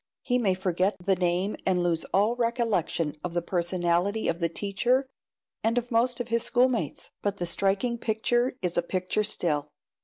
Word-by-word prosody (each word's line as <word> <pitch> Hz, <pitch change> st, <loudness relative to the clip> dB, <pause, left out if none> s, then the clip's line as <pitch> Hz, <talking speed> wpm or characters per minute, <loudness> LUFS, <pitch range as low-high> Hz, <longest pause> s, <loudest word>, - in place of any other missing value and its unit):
He 250 Hz, -1 st, +1 dB
may 195 Hz, -6 st, +2 dB
forget 185 Hz, +1 st, 0 dB
the 195 Hz, -1 st, +4 dB
name 180 Hz, +2 st, 0 dB
and 180 Hz, -2 st, +2 dB
lose 170 Hz, -2 st, 0 dB
all 210 Hz, +5 st, +2 dB
recollection 230 Hz, -10 st, 0 dB
of 175 Hz, -1 st, -4 dB
the 175 Hz, -, +2 dB
personality 175 Hz, +3 st, 0 dB
of 170 Hz, -, 0 dB
the 170 Hz, -1 st, +1 dB
teacher 225 Hz, +9 st, 0 dB, 0.6 s
and 230 Hz, +2 st, +1 dB
of 245 Hz, 0 st, -1 dB
most 240 Hz, +2 st, +2 dB
of 245 Hz, -1 st, -4 dB
his 230 Hz, 0 st, +2 dB
schoolmates, 245 Hz, -, 0 dB
but 205 Hz, -1 st, -1 dB
the 175 Hz, -, -2 dB
striking 195 Hz, +7 st, +1 dB
picture 240 Hz, +3 st, 0 dB
is 175 Hz, -1 st, -1 dB
a -, -, +4 dB
picture 185 Hz, +4 st, -1 dB
still. 155 Hz, -8 st, 0 dB
195 Hz, 175 wpm, -27 LUFS, 175-235 Hz, 0.6 s, the